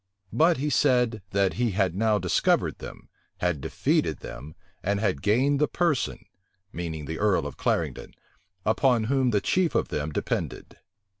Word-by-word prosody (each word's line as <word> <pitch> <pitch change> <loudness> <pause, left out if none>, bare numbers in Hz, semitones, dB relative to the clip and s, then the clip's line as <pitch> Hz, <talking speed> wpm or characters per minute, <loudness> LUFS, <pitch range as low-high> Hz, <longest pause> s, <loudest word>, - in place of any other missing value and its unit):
But 165 +2 +4
he 145 +3 -1
said, 125 -7 +2
that 100 -1 +1
he 120 -4 +1
had 95 -5 +2
now 110 +2 +2
discovered 90 -3 +1
them, - - -10 0.3
had 90 -5 -1
defeated - - 0
them, 70 +5 -9 0.3
and 100 +1 0
had 95 -10 0
gained 135 - +2
the 150 - +4
person, 170 -7 -1 0.5
meaning 80 -3 -5
the 80 +2 -5
earl 100 -7 +2
of 75 - -6
Clarendon, - - -2 0.5
upon 120 +1 +3
whom 130 +2 +1
the 105 -4 +1
chief 180 -3 +1
of - - +1
them 75 +1 -3
depended. - - -4
105 Hz, 155 wpm, -26 LUFS, 90-130 Hz, 0.5 s, But